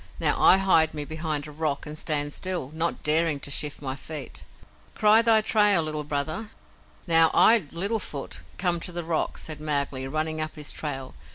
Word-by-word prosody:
Now - - +2
I 190 - +7
hide 165 -5 +3
me 150 -1 -3
behind 155 -1 -3
a 150 - -10
rock 150 -1 -3
and 150 - -8
stand 145 -1 0
still, 180 -8 -3
not 165 +1 -3
daring 155 -1 +1
to 140 - -6
shift 145 +1 -2
my 130 -1 -4
feet. 150 +2 -8 0.5
Cry 215 +1 +5
thy 225 -1 +5
trail, 210 -5 +3
Little 155 -1 -3
Brother." 150 +9 -4 0.6
"Now, 165 -1 +6
I, 220 -8 +5
Little 200 +7 0
Foot, 140 -7 -6 0.2
come 175 -2 0
to 180 - -3
the 175 0 -5
rock," 165 -1 -2
said 155 -2 -7
Mowgli, 140 -3 -2
running 155 +2 -3
up 155 0 -5
his 150 -2 -2
trail. 135 -4 -6
155 Hz, 185 wpm, -25 LUFS, 145-175 Hz, 0.6 s, I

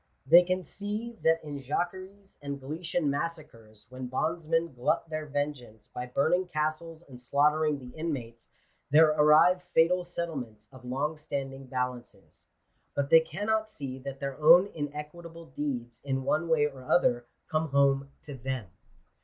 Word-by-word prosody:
They 175 - +8
can 185 +1 -1
see 210 +6 -6
that 165 0 +3
in 145 -2 -6
Jacqueries 185 +8 -4
and 140 -1 -5
Gallician 160 +5 -3
massacres, 140 -8 -4
when 130 0 -7
bondsmen 165 +4 -1
glut 125 +6 0
their 155 0 -4
vengeance 140 -7 -4
by 125 0 -6
burning 160 +8 +1
castles 155 +1 -3
and 125 -3 -12
slaughtering 150 +4 +2
the 125 -2 -12
inmates, 125 -8 -5 0.4
there 155 +2 +7
arrive 155 +4 +5
fatal 180 +3 +4
settlements 140 -12 -6
of 130 -1 -14
long 140 +5 -2
standing 135 -3 -5
ba 125 0 0
lances. 120 -1 -15 0.5
But 140 0 -1
they 165 - +10
cannot 210 +7 -1
see 135 -9 -7
that 135 0 -7
their 140 +1 -5
own 175 +6 +7
inequitable 160 +3 -7
deeds, 130 -5 -5
in 135 -1 -2
one 155 +5 0
way 155 -2 +4
or 135 -3 -6
other, 120 -5 +2 0.2
come 155 0 0
home 140 0 +2
to 145 - -8
them. 130 -6 -5
150 Hz, 150 wpm, -29 LUFS, 130-165 Hz, 0.5 s, they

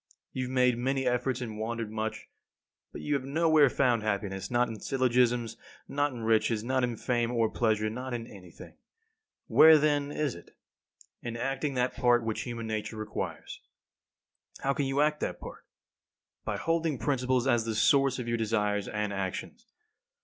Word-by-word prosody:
You 130 - -2
have 125 - -6
made 125 -2 +2
many 135 +1 0
efforts 125 +1 0
and 110 -3 -5
wandered 115 -1 -3
much, 110 0 -4 0.6
but - - -8
you 150 - -1
have 140 -2 0
nowhere 155 0 +4
found 125 -3 +2
happiness; 100 -2 -3
not 125 0 +2
in 115 -2 -7
syllogisms, 125 -3 +1 0.3
not 145 +1 0
in 120 -3 -7
riches, 110 0 +2
not 130 +1 0
in 120 -2 -1
fame 120 0 0
or 115 -2 +1
pleasure, 110 -2 +1
not 125 +4 -5
in 120 -2 -4
anything. 95 -6 -13 0.7
Where, 160 0 +7
then, 145 -1 +1
is 145 -3 -1
it? 85 - -15 0.6
In 120 0 -5
acting 135 +3 -2
that 125 0 0
part 120 -1 +3
which 110 -1 -2
human 120 -2 -5
nature 110 0 -4
requires. 110 0 -5 1.0
How 140 - +1
can 140 0 -1
you 135 +2 +1
act 150 0 +2
that - - -3
part? - - -10 0.8
By - - -2
holding 165 -3 0
principles 130 0 0
as 120 -4 +2
the 115 -1 -2
source 135 +4 +3
of 125 -2 -5
your 120 0 0
desires 105 -3 0
and 105 -1 -2
actions. 100 - -5
120 Hz, 170 wpm, -29 LUFS, 110-135 Hz, 1.0 s, Where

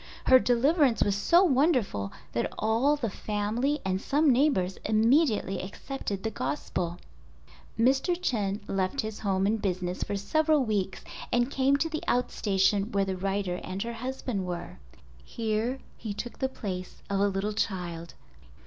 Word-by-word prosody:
Her 260 - +8
deliverance 260 +1 +3
was 200 - +1
so 340 - +4
wonderful 255 - +2 0.2
that 120 - -1
all 230 +7 +2
the 260 -6 -2
family 220 +9 -1
and 190 0 0
some 290 +3 +3
neighbors 240 -9 +2
immediately 220 - +2
accepted 200 0 -5
the 220 - -1
Gospel. 165 +3 -3 0.8
Mr. 270 +9 +2
Chen 210 - -1
left 195 +7 0
his 220 -1 -6
home 195 -2 0
and 215 +1 +1
business 180 -2 -2
for 205 - -2
several 305 +9 +2
weeks 200 -4 -2 0.3
and 240 +2 +2
came 275 +1 +3
to 320 - 0
the 315 -1 -4
out 250 +1 +1
station 195 +1 +1
where 200 -1 +1
the 190 -1 -2
writer 195 -1 -2
and 190 +1 -4
her 235 0 -4
husband 250 -3 -3
were. 175 +1 -6 0.4
Here 225 +2 -2 0.2
he 215 -3 -5
took 240 +3 -6
the 265 - 0
place 185 -8 -6
of 200 -1 -1
a 200 - +4
little 200 +2 -1
child. 175 -5 -3
215 Hz, 155 wpm, -28 LUFS, 195-260 Hz, 0.8 s, Her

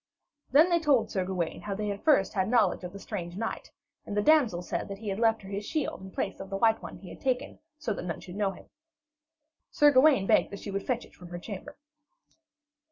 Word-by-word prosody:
Then 310 +7 +6
they 340 - +4
told 275 -9 +2
Sir 190 - 0
Gawaine 180 -3 -3
how 205 -1 -4
they 210 +1 -2
had 200 0 -4
first 285 -12 +4
had 190 +1 0
knowledge 220 -7 +3
of 180 - -5
the 200 - -9
strange 180 -3 -6
knight; 225 +1 -4 0.3
and 205 - -5
the - - +4
damsel 245 - +4
said - - -3
that 200 -1 -6
he 210 0 -5
had 195 +2 -2
left 225 -2 +2
her 190 - -9
his 200 +1 -3
shield 300 -3 -2
in 190 - -9
place - - -3
of 195 - -7
the 195 - -2
white 225 +1 +3
one - - -8
he 185 - -11
had - - -11
taken, 255 -2 -1 0.2
so 270 -8 -2
that - - -5
none 170 -3 -3
should 180 - -10
know 205 -1 +1
him. 195 - -10 1.0
Sir 295 0 +5
Gawaine 265 -6 +5
begged - - +4
that 200 - -7
she 200 - -6
would 195 0 -4
fetch 245 -2 -1
it - - -21
from 180 - -12
her 175 0 -6
chamber. 205 +10 -8
205 Hz, 240 wpm, -29 LUFS, 190-250 Hz, 1.0 s, Then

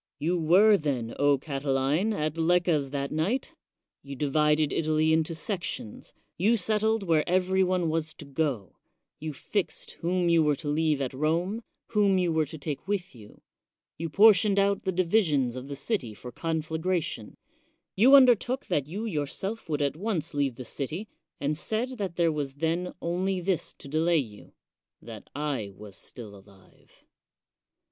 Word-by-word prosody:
You 170 +3 0
were, 195 +7 +6
then, 130 -8 -2
O 145 0 +4
Catiline, 140 +6 0
at 155 -6 -2
Lecca's 165 -3 +2
that 140 0 -3
night; 180 +12 -1 0.5
you 140 0 -8
divided 150 +2 +2
Italy 155 0 +2
into 160 +1 +1
sections; 175 - -5 0.2
you 220 +6 +3
settled 220 +2 +1
where 165 -4 +2
every 185 +1 +2
one 180 -2 +1
was 160 -1 -2
to - - -10
go; 140 - -2 0.4
you 155 +1 -4
fixed 190 +7 -3
whom 175 +1 +1
you 170 -1 +4
were 150 -2 +2
to 150 - -8
leave 150 -1 +1
at 130 -1 -2
Rome, 170 - 0 0.3
whom 205 -3 +3
you 175 -3 +1
were 160 -2 +1
to 160 +2 -8
take 145 +1 -5
with 195 -2 -2
you; 105 -4 -15 0.5
you 165 +1 -4
portioned 205 +2 +5
out 200 0 +2
the 190 - +1
divisions 165 - +2
of 130 +1 -7
the 140 - -5
city 140 - -2
for 125 - -9
coii^agration; 160 - -2 0.6
you 250 +8 +7
undertook 255 0 +4
that 145 -2 -1
you 200 +8 -4
yourself 190 +4 -4
would 150 -1 0
at 140 0 0
once 175 -4 -2
leave 140 -4 0
the 125 - -8
city, 155 - -4 0.3
and 145 +2 -1
said 230 - -3
that 190 -4 -3
there 170 -2 +2
was 145 -3 -3
then 165 +4 -1
only 185 +2 -1
this 180 -2 -1
to - - -11
delay 160 +4 +2
you, 110 -8 -5 0.2
— - - -64
that 110 -3 -11
I 140 -8 -2
was 100 -1 -11
still 105 -1 -9
alive. 95 -1 -20
160 Hz, 165 wpm, -27 LUFS, 140-185 Hz, 0.6 s, you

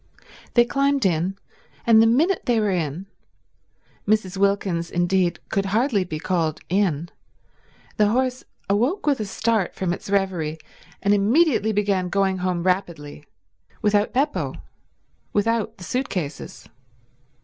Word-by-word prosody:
They 240 -1 +6
climbed 275 +1 +1
in, 180 +2 0 0.5
and 225 -1 +6
the 225 - +5
minute 320 +11 +2
they 240 -2 +3
were 210 -2 +1
in—Mrs. 185 +4 -5
Wilkins, 190 -3 0
indeed, 175 0 +1
could 195 0 0
hardly 220 0 +1
be 160 -4 -5
called 165 -2 -1
in—the 185 +3 -3
horse 255 +3 0 0.2
awoke 250 - 0
with 285 -4 +2
a 215 - -2
start 220 -1 -1
from 180 -2 -1
its 180 - -8
reverie 185 -6 0 0.5
and 200 - +4
immediately 220 +3 +3
began 200 -3 0
going 190 0 +1
home 180 -1 -1
rapidly; 170 -6 -2 0.6
without 210 0 +2
Beppo; 285 +4 -1 0.8
without 225 +1 0
the 180 - -11
suit 255 +9 -2
cases. 155 -7 -5
200 Hz, 125 wpm, -23 LUFS, 180-225 Hz, 0.8 s, They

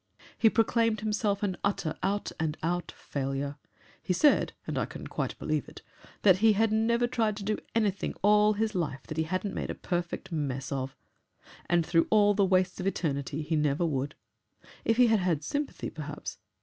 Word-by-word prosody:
He 225 - +5
proclaimed 225 -1 +2
himself 210 -1 0
an 190 -3 -1
utter 165 -5 0
out 200 +2 -1
and 160 -1 -1
out 175 +2 -1
failure. 140 +1 -3 0.4
He 185 - 0
said, 290 - +4
and - - -3
I - - 0
can - - -8
quite - - -3
believe - - -2
it, - - -13 0.4
that 190 -3 +7
he 220 0 +6
had 220 +1 +2
never 235 +2 +2
tried 225 -4 0
to 205 - -6
do 210 +1 -1 0.2
anything 205 -4 0
all 210 +1 +5
his 215 +1 -1
life 150 -8 -2
that 155 - -7
he 160 - +1
hadn't 185 +4 -2
made - - -3
a - - -3
perfect 175 0 -3
mess 135 -4 -2
of 135 0 -3 0.7
and 175 -2 +2
through 165 -1 +3
all 205 -1 +5
the 200 - +3
wastes 185 0 +2
of 185 - -2
eternity 145 -4 -2
he 160 +2 -1
never 150 +2 +1
would. 140 -2 -2 0.7
If 225 - +2
he 250 - +7
had 225 -2 +4
had 170 -5 0
sympathy, 285 - -3
perhaps 145 -11 -7
185 Hz, 190 wpm, -29 LUFS, 155-215 Hz, 0.7 s, that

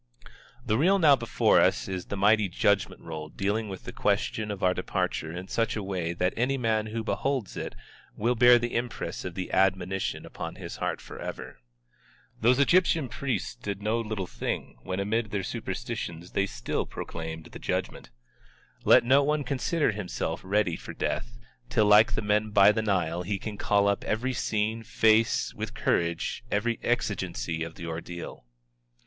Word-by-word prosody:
The 110 0 +1
reel 190 +6 +5
now 155 -6 +6
before 115 -3 +3
us - - +2
is 95 -2 -4
the 100 - -5
mighty 105 0 +4
judgment 100 +2 +1
roll 80 -2 -6
dealing 105 +5 -1
with 95 -1 -7
the - - -6
question 110 -1 0
of 100 -2 -5
our 90 0 +4
departure 80 -3 -2
in 90 +2 -6
such 115 +3 0
a 105 - -3
way 90 -4 -2
that 90 +1 0
any 130 +4 +1
man 110 -3 0
who 110 +1 -3
beholds 130 -2 -1
it - - -5 0.4
will 115 +4 +2
bear 120 0 +7
the 120 0 -2
impress 120 0 -3
of 90 -2 -6
the 95 - -4
admonition 95 0 +1
upon - - -6
his - - -7
heart - - -2
forever. - - -8 0.8
Those 120 +3 +4
Egyptian 160 -1 +3
priests 130 +1 -2
did 105 -5 -6
no 110 +2 +1
little 105 -4 -3
thing, - - -4
when 95 +5 -4
amid 110 +2 0
their 100 -1 -2
superstitions 85 0 -5
they 100 0 +1
still - - -3
proclaimed 80 -1 -6
the - - -9
Judgment. - - -3 0.7
Let - - +7
no 135 +4 +5
one 150 +1 +1
consider 140 +3 0
himself 90 -5 -3
ready 95 -2 +1
for - - -8
death, - - -3 0.3
till 105 - +3
like 105 +3 +6
the - - -1
men 105 +1 +1
by 105 0 +6
the 110 +1 0
Nile 90 -5 0
he 100 +3 -2
can 105 +1 -6
call 100 0 +2
up 100 -1 +1
every 125 +5 -1
scene, 110 -1 -1
face 110 -1 +2
with - - -6
courage 85 +5 0
every 115 +3 0
exigency 70 +7 -1
of 80 0 -7
the 85 - -7
ordeal. 85 -4 -7
105 Hz, 170 wpm, -28 LUFS, 95-115 Hz, 0.8 s, bear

